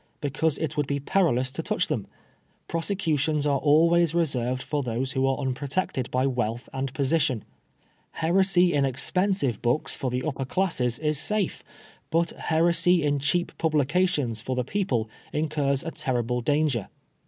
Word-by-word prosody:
Because 150 +2 0
it 155 -2 -3
would 145 -2 0
be 140 0 -1
perilous 135 -5 +1
to - - -4
touch - - 0
them. - - -2 0.6
Prosecutions 160 -4 0
are 140 -2 +2
always 165 +3 +4
reserved 130 -6 0
for 150 -1 -1
those 125 +1 -2
who 135 -1 +1
are 135 - +1
unprotected 135 0 -2
by 130 +1 +1
wealth 120 -2 -2
and 135 0 -3
position. 140 -5 +1 0.7
Heresy 180 +1 +3
in 145 -1 +2
expensive 140 - 0
books 120 +5 0
for 130 - -2
the 125 +1 -2
upper 135 -3 -2
classes 130 -8 0
is 150 -2 0
safe, 210 +1 0 0.5
but 165 +1 +1
heresy 170 +1 +2
in 145 -1 +1
cheap 175 +6 0
publications 150 - +1
for 130 - -3
the 125 - 0
people 130 - -1 0.3
incurs 145 -3 0
a 165 - -4
terrible 125 -3 -1
danger. 145 -4 +1
145 Hz, 150 wpm, -26 LUFS, 130-165 Hz, 0.7 s, always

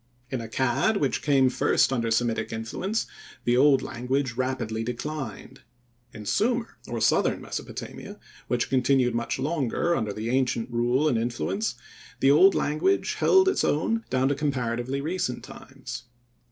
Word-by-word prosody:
In 130 - -1
Accad, 130 - +1
which 140 -8 0
came 135 -3 +4
first 130 +1 +2
under 115 -3 0
Semitic 115 0 0
influence, 115 - -2 0.4
the 120 - +2
old 135 +1 +5
language 130 +1 -2
rapidly 120 -3 -2
declined. 125 0 -6 0.5
In 105 - -9
Sumir, 230 - 0 0.2
or 120 - -3
southern - - +2
Mesopotamia, - - -7 0.3
which 120 -1 0
continued 130 -1 +3
much 115 0 -2
longer 150 +3 0
under 110 -7 -1
the 110 +3 -3
ancient 125 -2 0
rule 120 +5 +2
and 120 -6 +2
influence, 125 - -2 0.4
the 135 - +5
old 190 +7 +6
language 155 - +1
held 380 0 +5
its 385 - +2
own 225 +10 +1
down 130 +1 +2
to - - +2
comparatively 130 -2 -2
recent 150 -7 -2
times. 130 -2 -9
130 Hz, 140 wpm, -26 LUFS, 120-150 Hz, 0.5 s, old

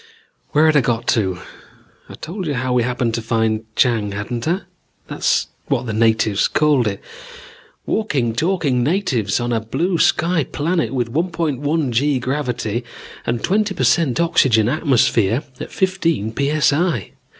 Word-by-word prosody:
"Where 150 +2 +3
had 155 -1 +4
I 145 - +6
got 120 -1 -1
to? 95 -5 +1 0.7
I'd - - -12
told 180 +2 -5
you 145 - -1
how 125 +1 -1
we 125 - +3
happened 120 -1 -1
to 115 - -2
find 110 -1 0
Chang, 110 -5 +1
hadn't 115 +5 -4
I? 180 +4 0 0.4
That's - - 0 0.2
what 120 - 0
the 110 - -3
natives 110 -2 +2
called 145 -6 +2
it. 100 -1 -4 0.8
Walking, 140 - 0
talking 155 -3 0
natives 130 - 0
on 120 0 -1
a 115 - +1
blue 165 - -1
sky 170 -2 +2
planet 165 +6 -1
with 120 -3 -2
1.1 155 -3 -1
g 140 +4 +1
gravity 125 -3 -2 0.4
and 115 0 0
a - - -14
twenty 205 +1 +1
per - - -1
cent 160 -7 +2
oxygen 135 -10 +3
atmosphere 125 - +2 0.2
at - - -7
fifteen 165 - 0
p.s.i. 145 - +1
130 Hz, 150 wpm, -19 LUFS, 115-160 Hz, 0.8 s, I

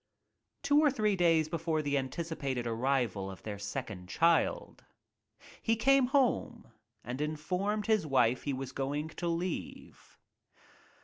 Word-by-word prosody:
Two 285 +1 +4
or 305 -1 +5
three 215 -6 +1
days 165 -3 +3
before 160 -1 -1
the 145 -1 0
anticipated 135 -2 -3
arrival 115 -4 0
of 95 - -10
their 105 -2 -6
second 100 -2 -6
child, 165 - +1 0.8
he 225 - +2
came 270 +3 +4
home 245 - 0 0.3
and 125 +4 -5
informed 180 +8 -2
his 215 -7 +2
wife 125 -3 +3
he 145 - -2
was 130 0 -5
going 145 +3 -3
to 170 +2 -5
leave. 170 +1 -5
155 Hz, 130 wpm, -31 LUFS, 130-200 Hz, 0.8 s, or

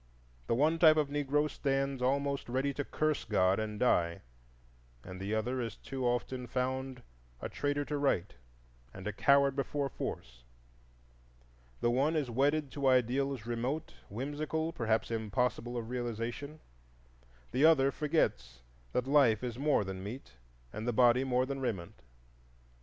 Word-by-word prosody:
The - - +2
one 155 +6 +2
type 155 -2 +7
of 150 -2 +1
Negro 145 +1 +1
stands 135 -2 -1
almost 140 +1 0
ready 135 +3 0
to 145 - -2
curse 155 +2 -1
God 95 -2 +2
and 105 -1 -4
die, 85 -9 +2 0.8
and 90 0 -9
the 100 +3 -1
other 125 +4 -1
is 115 -1 -4
too 130 -2 -4
often 125 +1 -2
found 130 0 -3 0.4
a - - -4
traitor 145 0 -1
to 145 0 -2
right 105 -10 +1 0.6
and 95 - -9
a 105 - -2
coward 140 +3 +4
before 140 0 -1
force; - - -6 1.4
the 120 - +2
one 140 +6 +2
is 145 -6 -1
wedded 140 +3 +1
to 140 -2 -1
ideals 130 0 +2
remote, 125 +7 -3 0.2
whimsical, 150 +7 -3
perhaps 115 0 0
impossible 115 +2 -1
of 115 0 -5
realization; 120 +5 -4 0.9
the 130 +3 +1
other 145 -4 +6
forgets 105 - -1 0.3
that 125 - 0
life 135 -6 +4
is 120 0 -4
more 145 -6 +2
than 95 -1 -6
meat 110 - -7 0.4
and 110 +2 -5
the 120 - +1
body 120 +2 +5
more 130 -1 +1
than 135 +1 -4
raiment. 100 -10 -4
130 Hz, 145 wpm, -32 LUFS, 115-140 Hz, 1.4 s, type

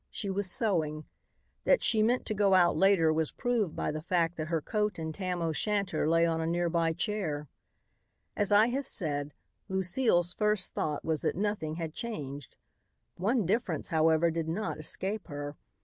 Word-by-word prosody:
She 200 - -3
was 195 0 0
sewing. 160 -8 0 0.6
That - - +3
she 220 -2 +3
meant 240 +3 +2
to 215 - -2
go 200 -2 +3
out 175 -2 +4
later 190 -5 +4
was 160 -1 0
proved 235 - -1
by - - -1
the 155 0 -5
fact 170 0 0
that 155 -1 -3
her 165 0 0
coat 210 +6 -1
and 160 -1 -4
tam 180 -1 -3
o' 165 - 0
shanter 200 -2 0
lay 165 +1 +4
on 165 -1 0
a 160 - -1
near 175 +1 0
by 165 -1 +1
chair. 160 -7 -2 0.9
As 205 0 +1
I 210 +3 +6
have 270 +3 -2
said, 145 -6 0 0.3
Lucile's 185 -1 +2
first 210 -3 0
thought 150 -2 -2
was 160 -2 0
that - - 0
nothing 200 -6 -2
had 165 -2 -5
changed. 145 - -6 0.6
One 215 +4 +1
difference, 195 - -1
however, 160 +1 +3
did 165 -1 -3
not 175 0 -3
escape 190 +6 -3
her. 145 0 -6
175 Hz, 180 wpm, -30 LUFS, 160-210 Hz, 0.9 s, I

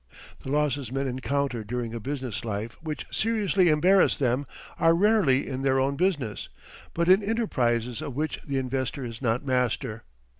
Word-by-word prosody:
The - - -7
losses 145 -3 0
men 135 +1 -1
encounter 130 -1 -1
during 115 +1 -4
a 115 - -4
business 130 -2 -4
life 110 +1 -4
which 155 -3 -5
seriously 200 -5 +2
embarrass 180 +6 +4
them 130 0 0 0.3
are 165 0 +5
rarely 190 -9 +3
in 130 0 -4
their 135 -1 +2
own 135 +1 +1
business, 145 - -1 0.5
but 170 0 +1
in 190 +3 +6
enterprises 125 - 0
of 135 - -5
which 155 +2 -2
the 140 -2 -3
investor 130 +1 -2
is 115 0 -7
not 120 +2 0
master. 125 -3 -1
135 Hz, 160 wpm, -26 LUFS, 125-155 Hz, 0.5 s, in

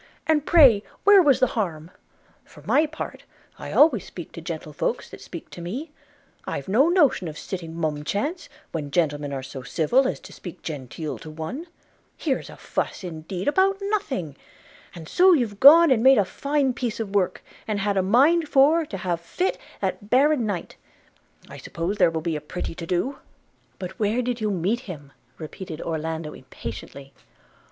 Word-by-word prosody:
and 305 -2 +1
pray 270 -12 +7 0.2
where 405 -1 +8
was 285 -6 +4
the - - +5
harm? 170 -6 -3 0.5
For - - -17
my 310 +1 +3
part, 315 +1 -7 0.4
I - - -7
always 310 +2 +5
speak - - -9
to - - -9
gentlefolks - - -3
that - - -11
speak - - -9
to 175 - -9
me; 255 - -5 0.5
I've - - -4
no 250 - +4
notion 295 - +3
of 155 -1 -7
sitting 165 -4 -6
mum 155 -3 -2
chance, 290 - -3 0.2
when 150 -3 -4
gentlemen 145 -3 0
are 135 -1 -4
so 130 0 -8
civil 165 - +2
as - - -3
to - - -12
speak 175 - -10
genteel 150 +1 -5
to 155 - -10
one. 160 - -6 0.5
Here's 275 -5 -2
a - - -11
fuss, - - -3
indeed, 175 +2 -6
about 380 +6 +3
nothing! 350 - -2 0.6
And 165 -2 -9
so 370 - +5
you've 230 -10 0
gone 320 +3 +9
and 235 -4 +4
made 265 +1 +7
a 205 - +4
fine 280 +4 0
piece 235 -2 -3
of 210 -3 -4
work, 195 -3 0 0.2
and 210 -2 -1
had 200 0 0
a 190 - +3
mind 290 - +3
for 300 +4 +4
to 195 - -5
have 175 -2 -2
fit 360 - -2 0.2
that 205 -2 -3
baron 270 -1 +3
knight 190 -5 -4 0.4
– - - -30
I - - -10
suppose 175 +5 -4
there - - +5
will 160 -1 -3
be 165 0 -2
a 150 - -4
pretty 160 +4 -5
to 165 0 -8
do!' 210 +11 -1 0.6
'But 185 0 -7
where 220 +4 +1
did 245 -1 -3
you 215 - 0
meet 195 +5 0
him?' 145 -5 -8 0.3
repeated 160 +1 -8
Orlando 160 -1 -4
impatiently. 135 +1 -9
200 Hz, 180 wpm, -24 LUFS, -, 0.6 s, gone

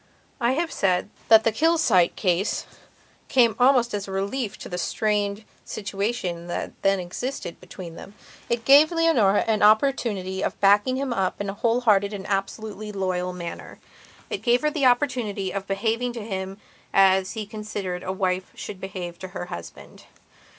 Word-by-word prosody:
I 240 +2 +2
have 330 +4 -1
said 185 +1 0 0.2
that 220 -1 +7
the 225 - +3
Kilsyte 315 - +3
case 185 0 0 0.6
came 235 -5 +4
almost 245 -2 +4
as 200 -1 -3
a - - -7
relief 200 +4 -2
to - - -9
the 180 - -4
strained 210 +1 -1 0.2
situation 195 -4 -3
that 175 - -4
then 195 0 +2
existed 180 +2 -5
between 180 -2 -9
them. 195 +4 -11 0.3
It 235 -1 -1
gave 290 +5 +7
Leonora 320 - +3
an 220 -2 +1
opportunity 210 -4 +2
of - - -3
backing 205 +6 +4
him 265 -2 -2
up 190 -4 -1
in 205 -1 -2
a - - -8
whole 230 +4 +1
hearted 205 -3 +3
and 195 -2 -6
absolutely 210 +1 -3
loyal 185 -2 -2
manner. 175 -2 -7 0.5
It 425 - -3
gave 240 0 +3
her 300 0 +1
the 280 -3 +2
opportunity 240 -7 0
of 195 -1 -4
behaving 225 +5 -1
to 230 -3 -6
him 190 -2 -4 0.3
as 190 -1 +4
he 220 -2 -4
considered 205 -4 -5
a 185 - -3
wife 185 -1 -1
should 195 -2 -8
behave 180 -3 -6
to 190 - -6
her - - -4
husband. 85 0 -10
205 Hz, 165 wpm, -24 LUFS, 190-235 Hz, 0.6 s, that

